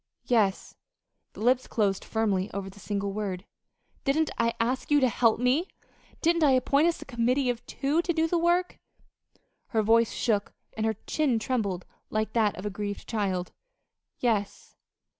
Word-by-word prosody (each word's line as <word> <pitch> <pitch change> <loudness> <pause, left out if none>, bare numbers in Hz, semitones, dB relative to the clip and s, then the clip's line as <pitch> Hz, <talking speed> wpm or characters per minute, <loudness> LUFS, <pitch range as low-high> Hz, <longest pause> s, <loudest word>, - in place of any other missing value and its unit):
"Yes." 215 -6 +1 0.6
The - - -10
lips 250 +3 +2
closed 200 -3 0
firmly 205 -3 0
over 195 -1 -4
the 200 - -16
single 200 -1 -3
word. 195 -2 -3 0.6
"Didn't 305 +2 +1
I 230 0 +2
ask 250 +3 -1
you 295 0 +5
to 260 - +4
help 230 -1 +2
me? 260 +9 +2 0.6
Didn't 335 0 +3
I 280 -3 +5
appoint 280 +5 +3
us 340 - -1
a - - -22
committee 250 +1 +1
of 240 -1 -7
two 290 +5 0
to 345 - -1
do 325 -1 +1
the 340 +1 +1
work?" 350 +2 +1 0.9
Her 220 -2 +1
voice 230 +1 +4
shook, 210 -4 0 0.2
and 220 0 0
her 220 - 0
chin 290 -7 +1
trembled 210 -6 -2 0.2
like 215 0 -1
that 220 -3 +2
of 185 - -7
a 210 - -2
grieved 205 +1 -5
child. 190 -5 -1 0.7
"Yes." 215 -5 -1
230 Hz, 165 wpm, -27 LUFS, 205-275 Hz, 0.9 s, you